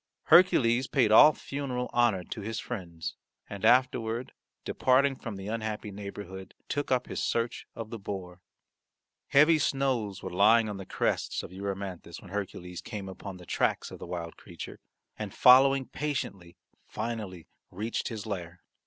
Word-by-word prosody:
Hercules 130 Hz, -8 st, +5 dB
paid 125 Hz, -6 st, +2 dB
all 150 Hz, +7 st, +9 dB
funeral 130 Hz, -4 st, -4 dB
honour 120 Hz, -6 st, +3 dB
to 110 Hz, -, -7 dB
his 110 Hz, +2 st, -4 dB
friends 85 Hz, -8 st, -5 dB, 0.3 s
and 100 Hz, 0 st, -8 dB
afterward 120 Hz, 0 st, +2 dB, 0.3 s
departing 135 Hz, +2 st, +3 dB
from 115 Hz, -4 st, -7 dB
the 95 Hz, 0 st, -8 dB
unhappy 110 Hz, -1 st, -3 dB
neighbourhood 100 Hz, -1 st, -8 dB
took 145 Hz, -1 st, -2 dB
up 125 Hz, -1 st, +2 dB
his -, -, -4 dB
search 115 Hz, 0 st, -1 dB
of 115 Hz, -1 st, -7 dB
the 115 Hz, -, -5 dB
boar. 90 Hz, -3 st, -7 dB, 0.9 s
Heavy 155 Hz, +3 st, +5 dB
snows 130 Hz, -9 st, 0 dB
were 95 Hz, -, -5 dB
lying 110 Hz, +4 st, +5 dB
on 105 Hz, -2 st, -4 dB
the 95 Hz, -, -8 dB
crests -, -, -1 dB
of -, -, -9 dB
Erymanthus 95 Hz, -3 st, -5 dB
when 90 Hz, -, -14 dB
Hercules 90 Hz, -3 st, -5 dB
came 105 Hz, -4 st, -6 dB
upon 95 Hz, 0 st, -8 dB
the 90 Hz, -, -13 dB
tracks -, -, 0 dB
of -, -, -9 dB
the -, -, -8 dB
wild 85 Hz, -2 st, -5 dB
creature, -, -, -9 dB, 0.4 s
and -, -, -5 dB
following 135 Hz, +1 st, +7 dB
patiently 100 Hz, -14 st, -4 dB, 0.3 s
finally 105 Hz, -6 st, -5 dB, 0.2 s
reached 110 Hz, +5 st, -3 dB
his 110 Hz, -4 st, -5 dB
lair. 90 Hz, -4 st, -6 dB
110 Hz, 155 wpm, -29 LUFS, 95-125 Hz, 0.9 s, all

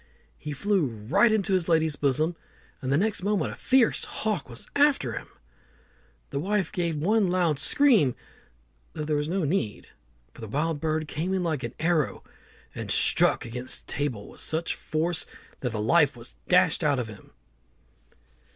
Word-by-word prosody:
He 150 Hz, -, -6 dB
flew 185 Hz, +3 st, +1 dB
right 130 Hz, -, +2 dB
into 200 Hz, -3 st, +1 dB
his 180 Hz, -2 st, +1 dB
lady's 160 Hz, -2 st, +2 dB
bosom, 150 Hz, +4 st, +1 dB, 0.5 s
and 130 Hz, -1 st, -2 dB
the 140 Hz, -, +3 dB
next 210 Hz, +3 st, 0 dB
moment 205 Hz, +1 st, 0 dB
a -, -, -8 dB
fierce 260 Hz, -3 st, +2 dB
hawk 215 Hz, -10 st, -3 dB
was 120 Hz, 0 st, -6 dB
after 285 Hz, -, +3 dB
him. -, -, -6 dB, 1.0 s
The 140 Hz, -, -2 dB
wife 195 Hz, +4 st, -1 dB
gave 170 Hz, -4 st, -1 dB
one 200 Hz, +7 st, +2 dB
loud 175 Hz, -5 st, +1 dB
scream, 230 Hz, -, +4 dB, 0.8 s
though 150 Hz, -, -4 dB
there 150 Hz, 0 st, -1 dB
was 150 Hz, +1 st, -1 dB
no 185 Hz, +1 st, 0 dB
need, 140 Hz, -, -2 dB, 0.4 s
for -, -, -14 dB
the 110 Hz, -, -6 dB
wild 150 Hz, +6 st, -1 dB
bird 155 Hz, -1 st, -1 dB
came 170 Hz, +6 st, -2 dB
in 185 Hz, -, -1 dB
like 155 Hz, -5 st, -1 dB
an 120 Hz, -1 st, -6 dB
arrow, 160 Hz, -2 st, 0 dB, 0.5 s
and -, -, -6 dB
struck -, -, +3 dB
against 125 Hz, +2 st, -3 dB
a -, -, -34 dB
table 130 Hz, -8 st, -3 dB
with -, -, -12 dB
such 160 Hz, +1 st, -2 dB
force 160 Hz, +2 st, -2 dB, 0.3 s
that 125 Hz, -, -2 dB
the 110 Hz, -, -4 dB
life 105 Hz, -, +3 dB
was -, -, -11 dB
dashed -, -, +4 dB
out 145 Hz, -2 st, +2 dB
of 125 Hz, -3 st, -2 dB
him. 105 Hz, -3 st, -12 dB
155 Hz, 170 wpm, -26 LUFS, 135-190 Hz, 1.0 s, scream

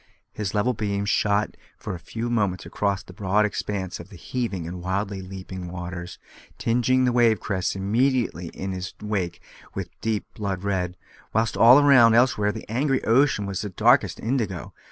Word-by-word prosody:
His 105 Hz, -3 st, -3 dB
level 120 Hz, +5 st, +2 dB
beams 100 Hz, -2 st, -1 dB
shot 105 Hz, 0 st, +1 dB, 0.2 s
for -, -, -5 dB
a 90 Hz, -, -6 dB
few 115 Hz, +7 st, -4 dB
moments 100 Hz, -6 st, 0 dB
across 100 Hz, -1 st, -1 dB
the 90 Hz, -, -13 dB
broad 100 Hz, +3 st, +2 dB
expanse 100 Hz, -3 st, -3 dB
of 85 Hz, +2 st, -10 dB
the 100 Hz, -, -12 dB
heaving 100 Hz, -2 st, -3 dB
and 90 Hz, +1 st, -6 dB
wildly 95 Hz, +2 st, -2 dB
leaping 95 Hz, -1 st, -7 dB
waters, 90 Hz, 0 st, -6 dB, 0.4 s
tinging 125 Hz, +2 st, +2 dB
the 125 Hz, -, +3 dB
wave 120 Hz, -4 st, +4 dB
crests 95 Hz, -1 st, -2 dB
immediately 110 Hz, -, 0 dB
in 95 Hz, +3 st, -5 dB
his 90 Hz, +1 st, -5 dB
wake 105 Hz, -5 st, -3 dB, 0.3 s
with -, -, -4 dB
deep 110 Hz, -1 st, -1 dB
blood 100 Hz, -3 st, -3 dB
red, 90 Hz, -3 st, -1 dB, 0.4 s
whilst 110 Hz, 0 st, +1 dB
all 120 Hz, +3 st, +8 dB
around 125 Hz, -6 st, +6 dB
elsewhere 115 Hz, -4 st, +3 dB
the 110 Hz, +1 st, -8 dB
angry 135 Hz, +4 st, 0 dB
ocean 115 Hz, -3 st, +3 dB
was 100 Hz, -2 st, -3 dB
darkest 100 Hz, -4 st, +2 dB
indigo. 110 Hz, -7 st, -2 dB
100 Hz, 165 wpm, -24 LUFS, 95-115 Hz, 0.4 s, all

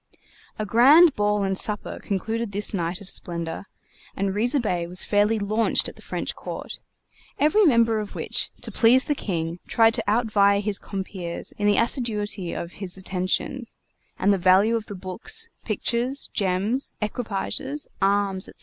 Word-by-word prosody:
A 215 Hz, -, -2 dB
grand 280 Hz, -, +6 dB
ball 210 Hz, 0 st, +1 dB
and 195 Hz, 0 st, 0 dB
supper 210 Hz, +2 st, 0 dB
concluded 220 Hz, +2 st, -3 dB
this 205 Hz, +2 st, -1 dB
night 175 Hz, 0 st, -2 dB
of 200 Hz, -, -11 dB
splendor, 170 Hz, +1 st, -2 dB, 0.5 s
and 195 Hz, 0 st, -1 dB
Riza 240 Hz, +7 st, +2 dB
Bey 180 Hz, -7 st, -1 dB
was 180 Hz, +1 st, +1 dB
fairly 210 Hz, +2 st, +2 dB
launched 215 Hz, +2 st, +1 dB
at -, -, -9 dB
the -, -, -16 dB
French -, -, -4 dB
court; -, -, -7 dB, 0.6 s
every 365 Hz, +9 st, +4 dB
member 230 Hz, -6 st, +3 dB
of 210 Hz, -1 st, -6 dB
which, -, -, -1 dB
to -, -, -3 dB
please 245 Hz, +3 st, +4 dB
the 295 Hz, -, +1 dB
King, 170 Hz, -, -3 dB
tried 225 Hz, -1 st, +4 dB
to -, -, -1 dB
outvie 205 Hz, -2 st, +3 dB
his 205 Hz, -1 st, -2 dB
compeers 190 Hz, -3 st, -6 dB
in 205 Hz, -, -2 dB
the 205 Hz, -, +3 dB
assiduity 210 Hz, -7 st, -1 dB
of 170 Hz, -, -5 dB
his 190 Hz, -1 st, -4 dB
attentions, 190 Hz, +7 st, -3 dB, 0.4 s
and 200 Hz, +2 st, +3 dB
the 195 Hz, -, 0 dB
value 190 Hz, +5 st, +4 dB
of 225 Hz, -1 st, -3 dB
the 205 Hz, -, -7 dB
books, 230 Hz, -, -1 dB, 0.2 s
pictures, 250 Hz, +3 st, -1 dB
gems, 200 Hz, +7 st, 0 dB
equipages, 235 Hz, +6 st, -3 dB
arms, 195 Hz, -1 st, +1 dB
&c. -, -, -10 dB
205 Hz, 160 wpm, -24 LUFS, 190-230 Hz, 0.6 s, grand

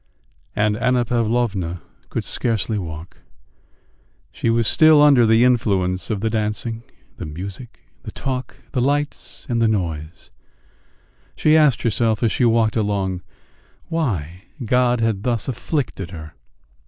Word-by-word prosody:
And 105 Hz, 0 st, +2 dB
Anna 125 Hz, 0 st, +1 dB
Pavlovna 110 Hz, -7 st, -1 dB, 0.3 s
could -, -, -3 dB
scarcely 110 Hz, -2 st, -1 dB
walk.... 80 Hz, -1 st, -8 dB, 1.1 s
She 115 Hz, -, -2 dB
was 115 Hz, -1 st, +2 dB
still 155 Hz, -1 st, +6 dB
under 140 Hz, -6 st, +6 dB
the 110 Hz, +2 st, +5 dB
influence 100 Hz, -7 st, +1 dB
of 105 Hz, -3 st, -2 dB
the 110 Hz, -, 0 dB
dancing, 110 Hz, +1 st, -2 dB, 0.4 s
the -, -, -6 dB
music, 95 Hz, +10 st, -8 dB, 0.2 s
the -, -, -8 dB
talk, 130 Hz, -2 st, -4 dB
the 125 Hz, -, 0 dB
lights, 145 Hz, +3 st, -2 dB
and 120 Hz, -3 st, 0 dB
the 115 Hz, -, +4 dB
noise; 85 Hz, -6 st, -3 dB, 1.0 s
she 155 Hz, 0 st, +3 dB
asked 150 Hz, -6 st, +4 dB
herself 115 Hz, 0 st, +1 dB
as 115 Hz, -, +2 dB
she 125 Hz, -, +1 dB
walked 115 Hz, -2 st, +2 dB
along 100 Hz, -4 st, -1 dB, 0.7 s
why 95 Hz, -, -2 dB, 0.2 s
God 125 Hz, +1 st, +2 dB
had 110 Hz, -4 st, 0 dB
thus 115 Hz, -1 st, -1 dB
afflicted 125 Hz, -, -3 dB
her. 80 Hz, -4 st, -9 dB
115 Hz, 130 wpm, -21 LUFS, 95-125 Hz, 1.1 s, still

